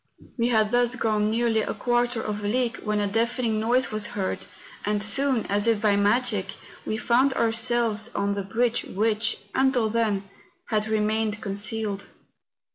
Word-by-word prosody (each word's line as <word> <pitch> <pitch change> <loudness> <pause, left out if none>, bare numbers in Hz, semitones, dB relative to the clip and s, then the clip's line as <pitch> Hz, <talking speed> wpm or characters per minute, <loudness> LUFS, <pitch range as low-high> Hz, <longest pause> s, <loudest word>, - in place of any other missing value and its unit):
We 235 -1 +1
had 220 -3 +2
thus 245 0 +2
gone 215 -3 +1
nearly 225 0 +1
a - - -3
quarter 240 -1 0
of 210 -1 -4
a - - -1
league 235 +1 0
when 210 -1 -1
a 205 - +1
deafening 225 +1 0
noise 245 +4 +1
was 215 -1 -1
heard, 190 -2 -4 0.4
and 205 0 0
soon, 255 +3 +2
as 205 +2 0
if 225 -2 +3
by 210 -1 +3
magic, 205 -1 +1 0.3
we 215 - -1
found 250 +3 +2
ourselves 230 -1 +1
on 200 0 0
the 200 - -2
bridge 230 +5 0
which, 220 +2 0 0.2
until 260 -4 +2
then, 210 -3 0 0.4
had 215 0 0
remained 215 0 0
con¬ 195 -2 -4
cealed. 205 -1 -3
220 Hz, 165 wpm, -25 LUFS, 210-240 Hz, 0.4 s, if